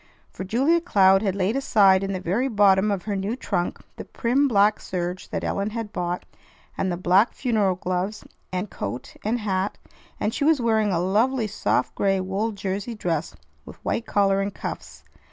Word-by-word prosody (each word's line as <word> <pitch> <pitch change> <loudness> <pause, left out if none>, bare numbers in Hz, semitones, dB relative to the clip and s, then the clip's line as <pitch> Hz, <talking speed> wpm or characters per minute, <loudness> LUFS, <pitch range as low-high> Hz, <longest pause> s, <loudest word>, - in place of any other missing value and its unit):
For - - -6
Julia 270 - +2
Cloud 195 - +4
had 195 -3 0
laid 200 +4 0
aside 200 -8 +4
in 195 - -2
the 185 - -2
very 195 +9 0
bottom 205 -3 +4
of 195 -3 -1
her 205 -1 -2
new 195 +4 -2
trunk 175 -8 -2 0.2
the - - -6
prim 265 +4 +1
black 210 -3 +3
serge 180 0 -4
that - - -3
Ellen 200 +1 -1
had 220 -1 -5
bought, 175 0 -3 0.5
and 190 - -1
the 175 - -2
black 185 +5 +3
funeral 215 -7 +1
gloves 185 +3 -3 0.3
and 185 +2 -2
coat 105 +5 -6
and 230 +3 -1
hat; 195 -1 -1 0.4
and 215 - -1
she 290 - -2
was 310 -1 +4
wearing 220 -3 +2
a 175 - +1
lovely 220 +7 +1
soft 205 -1 0
gray 195 -1 +1
wool 195 +4 -1
jersey 200 +3 -4
dress 170 -6 -2 0.3
with - - -11
white 230 - -1
collar 195 -1 +2
and 200 0 -3
cuffs. - - -7
200 Hz, 185 wpm, -24 LUFS, 190-225 Hz, 0.5 s, Cloud